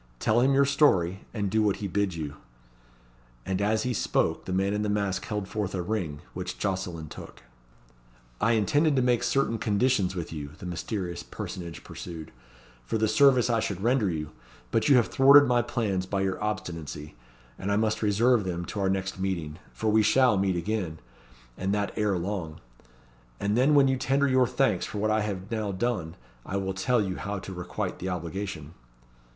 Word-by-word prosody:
Tell 110 - +2
him 130 +2 +4
your 140 0 +5
story; 95 - +2
and 100 -4 -2
do 110 - +2
what 105 -2 +2
he 100 - -4
bids 95 -2 -1
you." 75 -2 -5 1.1
And 95 0 -1
as 105 +2 +1
he 125 - -1
spoke 105 - 0
the - - -5
man 95 +2 +1
in 105 - -1
the 105 - -1
mask 100 -2 -1
held 105 -3 -3
forth 100 -2 -3
a 90 - -2
ring, 85 -8 -3
which - - -5
Jocelyn 90 -5 -3
took. - - -11 1.0
"I 115 +2 +3
intended 145 +8 +2
to 130 - +2
make 125 -1 +2
certain 120 -2 +1
conditions 105 -3 +1
with 85 -2 -5
you," 75 -2 -6
the - - -10
mysterious 90 +1 -4
personage 85 -3 -7
pursued, 80 -3 -8 0.5
"for - - -2
the 110 0 +2
service 130 +2 +5
I 115 -2 +2
should 100 -3 -3
render 120 -4 +2
you, 75 -3 -4 0.4
but 115 +6 +2
you 140 - +7
have 120 -3 +5
thwarted 140 +1 +7
my 120 -1 +3
plans 105 -6 -1
by 100 0 -1
your 95 +1 -1
obstinacy, 80 -8 -4 0.5
and 100 - -2
I - - +3
must 110 0 0
reserve 110 +2 +3
them 85 -2 -3
to 105 - -5
our 95 -1 +1
next 95 0 -2
meeting. 85 -5 -3
For 110 -1 -1
we 110 +1 +5
shall 125 +2 +4
meet 95 -1 +1
again, 90 -3 -2 0.6
and 95 +2 0
that 100 -1 -1
ere 105 -3 +1
long; 85 -3 -4 0.8
and 100 +1 0
then 135 +5 +4
when 140 -1 +6
you 130 0 +1
tender 135 +2 +2
your 130 -2 +4
thanks 125 -7 +1
for - - -6
what 110 +1 +1
I 110 0 +2
have 100 0 -4
now 110 -3 -1
done, 95 -5 -2 0.3
I 100 - -3
will 95 -1 -2
tell 110 +4 +1
you 95 -2 -3
how 100 0 -4
to 95 0 -7
requite 90 -1 -4
the 95 - -3
obligation." 85 -2 -5
100 Hz, 190 wpm, -27 LUFS, 90-115 Hz, 1.1 s, you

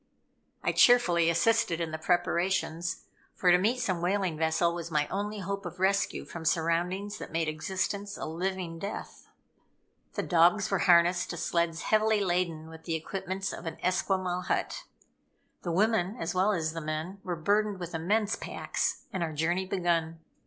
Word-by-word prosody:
I - - +2
cheerfully 175 -9 +5
assisted 175 0 +2
in 165 -2 -2
the 160 - -4
preparations, 175 0 0 0.3
for 180 - +3
to 175 - +6
meet 230 +7 +1
some 185 -8 -1
whaling 185 -1 0
vessel 160 +2 +1
was 170 -1 -5
my 150 -2 +1
only 205 +1 -3
hope 195 +2 -3
of 175 0 -8
rescue 195 +1 +1
from 170 - -8
surroundings 175 +5 0
that - - -8
made 165 0 0
existence 190 +5 -2
a - - -4
living 175 +1 -3
death. 200 +4 -7 0.9
The - - -1
dogs 175 +5 +3
were 195 - +2
harnessed 175 +1 +5
to 175 - -4
sleds 170 -1 0
heavily 215 0 +3
laden 175 -4 -1
with 160 0 -12
the 165 - -1
equipments 190 +3 -4
of 170 - -7
an 160 - -5
Esquimaux 185 0 0
hut. - - -1 0.8
The 175 - -3
woman, 205 +2 +1
as 165 - -2
well 185 +3 +3
as 160 -5 -1
the 165 - -4
men, 155 +5 -4
were 180 -2 -2
burdened 205 +4 +1
with 175 -1 -6
immense 205 +6 +1
packs; - - -3
and 190 - -2
our 165 -2 -2
journey 175 +5 0
begun. 170 -3 0
175 Hz, 165 wpm, -29 LUFS, 165-195 Hz, 0.9 s, to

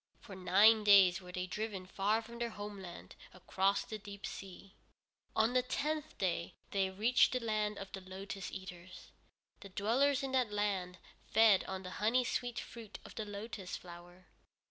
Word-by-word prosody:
For 195 - -10
nine 200 +4 +5
days 190 -3 +7
were 180 0 -10
they 180 0 -3
driven 200 0 -4
far 205 +4 0
from 235 +1 -10
their 235 0 -1
homeland, 205 -4 -8 0.2
across 195 +2 +1
the 215 - -6
deep 200 -1 -9
sea. 195 +1 -9 0.6
On 220 +2 +3
the 255 - +4
tenth 300 +4 -2
day 175 -3 -1 0.2
they 195 -1 +1
reached 220 +8 +3
the 255 - +1
Land 215 -2 -1
of 195 -1 -7
the 195 -1 -6
Lotus 190 +1 -7
Eaters. 185 -1 -9 0.5
The 200 - -10
dwellers 260 +9 +2
in 270 - -2
that 255 -5 +1
land 195 -3 -1 0.3
fed 220 -3 +5
on 190 0 -5
the 185 - -7
honey 235 +4 +3
sweet 245 0 -2
fruit 225 -3 -9
of - - -10
the 220 - -4
lotus 205 -2 -6
flower. 175 +1 -13
200 Hz, 165 wpm, -35 LUFS, 185-225 Hz, 0.6 s, days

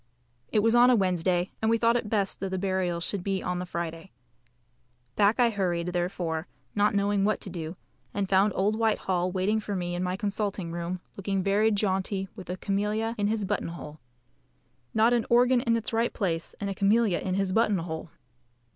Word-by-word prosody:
It 210 - +2
was 225 0 +4
on 240 +1 +7
a 250 - +6
Wednesday, 180 -2 +1
and 220 - +2
we 230 - +4
thought 230 +1 +3
it 235 -3 -1
best 200 -3 0
that 195 - -3
the 190 - -2
burial 185 -2 0
should 190 +1 -2
be 195 -1 -1
on 180 0 -2
the 180 - -5
Friday. 170 0 -5 1.1
Back 205 +4 +3
I 240 -1 +5
hurried, 180 -4 -1
therefore, 175 -2 -2 0.3
not 205 0 +2
knowing 200 0 +2
what 215 +1 +1
to 190 - -6
do 165 -2 -5
first, - - -24 0.4
and 200 -1 0
found 195 +2 +4
old 210 +3 +1
Whitehall 185 -5 +1
waiting 195 +4 +1
for 205 -1 -4
me 175 -1 -2
in 175 - -2
my 180 0 -1
consulting 200 -4 -2
room, 175 +1 -4 0.2
looking 195 -1 -1
very 205 +3 +3
jaunty 195 -2 0
with 190 -5 -10
a 180 - -3
camelia 210 +3 -1
in 205 - +2
his 215 -1 0
button 205 +2 -1
hole. 155 -2 -8 1.0
Not 225 +2 +5
an 235 -2 +1
organ 245 +1 +5
in 230 -2 +2
its 225 0 -4
right 230 +1 +1
place, 165 -5 -2
and 200 - -3
a 195 - -2
camelia 200 -1 +2
in 185 -1 -2
his 195 -1 0
button 220 -2 +3
hole! 165 -1 -5
195 Hz, 200 wpm, -27 LUFS, 180-215 Hz, 1.1 s, on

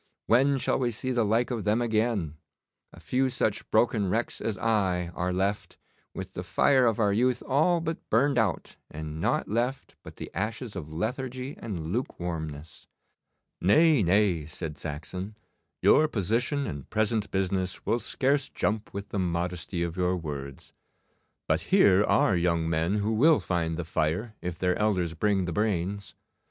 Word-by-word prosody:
When 135 +4 +4
shall 135 - 0
we 125 -2 +1
see 125 +3 -3
the 120 -2 +2
like 115 +4 +1
of 115 -4 -2
them 105 +2 +2
again? 110 -9 0 0.5
A - - -14
few 130 +1 0
such 110 -4 -1
broken 110 -3 +2
wrecks 115 +5 -1
as 110 -3 -2
I 95 -6 0
are 90 +1 -1
left, 95 +3 -2 0.4
with 95 0 -6
the - - -4
fire 130 +8 +3
of 115 -1 +1
our 105 -2 +3
youth 125 +3 +1
all 155 +6 +3
burned 140 -5 +1
out 105 -6 -1
and 80 0 -6
nought - - +1
left 120 +5 -2
but - - -12
the - - -8
ashes 115 0 -3
of 80 -5 -6
lethargy 125 - -3
and 85 -6 -5
lukewarmness.' 85 - -5 0.7
'Nay, 150 - +5
nay,' 90 -4 +2
said 80 -2 -6
Saxon, 85 +7 -6 0.5
'your 155 - +6
position 125 - 0
and 70 -7 -6
present 110 -1 0
business 95 -1 -1
will 120 - +1
scarce 135 +5 0
jump 105 -1 -2
with 100 0 -5
the 100 - -2
modesty 85 0 -2
of 85 -1 -3
your 90 0 +1
words. 70 -4 -7 0.7
But - - +1
here 100 0 +5
are 95 - +3
young 85 -2 +1
men 80 +4 0
who 105 +1 0
will 150 +8 +5
find 80 -3 -1
the 85 - -3
fire 85 +8 -1
if 90 -1 -4
their 90 -1 +1
elders 95 -6 +1
bring 95 +2 +1
the 85 - -3
brains. 100 -1 -1
100 Hz, 160 wpm, -27 LUFS, 85-120 Hz, 0.7 s, your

